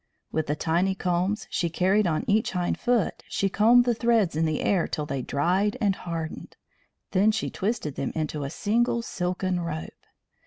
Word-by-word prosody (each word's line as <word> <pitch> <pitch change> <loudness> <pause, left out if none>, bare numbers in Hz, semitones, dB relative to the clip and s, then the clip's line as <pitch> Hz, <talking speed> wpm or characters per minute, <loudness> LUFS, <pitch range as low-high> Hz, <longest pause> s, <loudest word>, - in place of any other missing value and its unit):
With 160 -1 -1
the 150 - 0
tiny 175 +5 +1
combs 185 +3 -1
she 170 - 0
carried 190 +4 +2
on 155 -2 -1
each 215 +1 +2
hind 180 -1 -1
foot 240 -6 +1
she 195 - 0
combed 235 +5 +5
the 240 - +3
threads 230 -7 +2
in 160 +1 +1
the 155 -1 -1
air 185 -4 +1
till 150 - -3
they 135 -2 -3
dried 180 +11 0
and 200 -3 +2
hardened; 165 -3 -6 0.5
then 205 +3 +4
she 220 0 -2
twisted 195 - -2
them 135 - -2
into 155 -2 -2
a 140 - -3
single 235 +7 0
silken 180 -2 -2
rope. 165 -2 -4
185 Hz, 180 wpm, -26 LUFS, 160-210 Hz, 0.5 s, combed